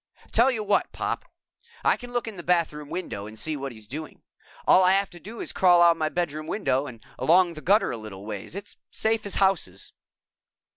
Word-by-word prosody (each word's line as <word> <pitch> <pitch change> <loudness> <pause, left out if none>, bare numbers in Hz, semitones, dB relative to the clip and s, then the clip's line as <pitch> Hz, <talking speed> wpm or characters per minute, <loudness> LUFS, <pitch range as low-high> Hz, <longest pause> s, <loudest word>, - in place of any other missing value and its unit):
"Tell 235 +4 +5
you 225 -5 -1
what, 205 0 +1
Pop - - -3 0.6
I - - +4
can 245 -1 -10
look 240 -1 -2
in 220 - -6
the 175 - -7
bathroom 165 -4 0
window 105 - -5
and 110 +1 -10
see 155 +7 -2
what 140 -1 -5
he's 110 -2 -11
doing. 155 +6 -7 0.4
All 185 - +6
I 185 +1 +5
have 195 0 +1
to 175 - -12
do 220 +6 -10
is - - -4
crawl 180 -2 +5
out 170 -1 +6
my 155 -1 -1
bedroom 155 -2 -3
window 145 -9 0
and 115 -4 -11
along 175 +1 +4
the 155 - -9
gutter 205 +6 +3
a 120 - -4
little 105 -3 -9
ways. 105 - -6
It's 200 +1 -7
safe 220 -1 0
as 200 - 0
houses." 175 - 0
170 Hz, 210 wpm, -26 LUFS, 140-200 Hz, 0.6 s, All